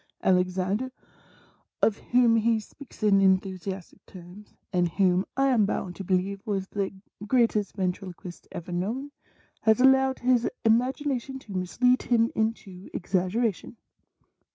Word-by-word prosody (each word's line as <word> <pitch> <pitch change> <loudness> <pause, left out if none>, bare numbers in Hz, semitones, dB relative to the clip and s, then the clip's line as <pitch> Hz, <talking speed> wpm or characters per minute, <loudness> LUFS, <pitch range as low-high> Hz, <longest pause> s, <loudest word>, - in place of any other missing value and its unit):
Alexandre 185 +5 +1 0.5
— - - -35
of 220 -1 +3
whom 240 -2 +3
he 225 0 +2
speaks 235 +2 -13
in 200 -2 +5
enthusiastic 190 -1 -1
terms, 185 +3 -13 0.2
and 175 -1 +2
whom 185 -2 +3
I 270 0 +3
am 225 -6 +3
bound 180 -3 -3
to 195 - -5
believe 190 +2 -1
was 195 -3 -2
the 200 -2 -2 0.4
greatest 230 -4 +1
ventriloquist 185 -2 -5
ever 175 +1 -7
known 225 +11 -3 0.2
— - - -36
has 220 +2 +5
allowed 265 0 +4
his 245 -1 +2 0.2
imagination 260 +3 +1
to 240 -6 -13
mislead 250 +8 +2
him 230 -1 +2
into 205 -4 -3
exaggeration. 195 +5 -1
205 Hz, 130 wpm, -26 LUFS, 185-245 Hz, 0.5 s, in